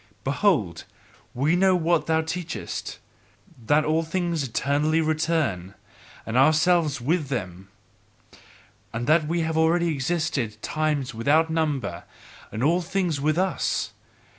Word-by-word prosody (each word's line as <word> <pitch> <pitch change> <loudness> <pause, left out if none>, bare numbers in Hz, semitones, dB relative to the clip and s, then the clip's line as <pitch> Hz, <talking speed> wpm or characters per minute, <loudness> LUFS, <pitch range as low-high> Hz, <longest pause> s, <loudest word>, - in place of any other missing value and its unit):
Behold, 135 - 0 0.5
we 145 +7 +2
know 190 +1 +4
what 170 -1 +1
thou 160 0 +2
teachest: 165 +1 -5 0.7
that 150 +1 +3
all 155 +1 +2
things 170 -1 -2
eternally 145 +5 0
return, 155 - -1 0.5
and 110 - -4
ourselves 155 +1 +3
with 150 +5 0
them, 95 -7 -5 1.2
and 115 +1 -3
that 155 +2 +3
we 170 +2 0
have 160 0 -1
already 170 +1 +3
existed 145 -7 -2
times 150 -4 -1
without 150 +8 +2
number, 145 - -1 0.5
and 110 - -3
all 170 +5 +3
things 175 -4 -1
with 155 +2 +1
us. 190 +1 0
155 Hz, 120 wpm, -24 LUFS, 135-165 Hz, 1.2 s, know